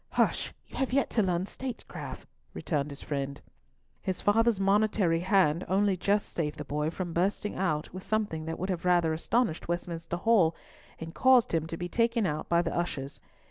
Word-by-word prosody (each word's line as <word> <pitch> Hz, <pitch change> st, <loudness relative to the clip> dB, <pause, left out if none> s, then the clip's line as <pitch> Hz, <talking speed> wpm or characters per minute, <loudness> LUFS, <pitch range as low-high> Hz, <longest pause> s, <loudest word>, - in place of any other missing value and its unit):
"Hush! -, -, +1 dB
you -, -, -11 dB
have 265 Hz, -2 st, 0 dB
yet 275 Hz, 0 st, +2 dB
to 225 Hz, -, +2 dB
learn 180 Hz, -2 st, 0 dB
statecraft," 255 Hz, +3 st, -7 dB, 0.3 s
returned 140 Hz, -, -1 dB
his 140 Hz, 0 st, -9 dB
friend. 140 Hz, -1 st, -3 dB, 0.6 s
His 185 Hz, -1 st, -2 dB
father's 225 Hz, +1 st, +3 dB
monitory 195 Hz, -3 st, +2 dB
hand 180 Hz, -3 st, +3 dB
only 195 Hz, +1 st, +2 dB
just 200 Hz, +3 st, 0 dB
saved 150 Hz, -2 st, -2 dB
the 150 Hz, -, -6 dB
boy 150 Hz, +2 st, -1 dB
from 175 Hz, 0 st, -4 dB
bursting 195 Hz, +4 st, 0 dB
out 160 Hz, -5 st, -1 dB
with 185 Hz, -, -6 dB
something 205 Hz, -8 st, -1 dB
that 165 Hz, 0 st, -4 dB
would 185 Hz, -, -3 dB
have 175 Hz, -2 st, -3 dB
rather 175 Hz, -3 st, +3 dB
astonished 170 Hz, +2 st, 0 dB
Westminster 170 Hz, -1 st, -3 dB
Hall, 185 Hz, -5 st, +3 dB, 0.4 s
and 165 Hz, 0 st, -7 dB
caused 260 Hz, -6 st, +4 dB
him 160 Hz, -1 st, +1 dB
to 165 Hz, -, -5 dB
be 175 Hz, -, -3 dB
taken 230 Hz, +2 st, +1 dB
out 155 Hz, -3 st, -2 dB
by 170 Hz, 0 st, +3 dB
the -, -, -3 dB
ushers. 145 Hz, -5 st, -3 dB
175 Hz, 180 wpm, -29 LUFS, 160-205 Hz, 0.6 s, caused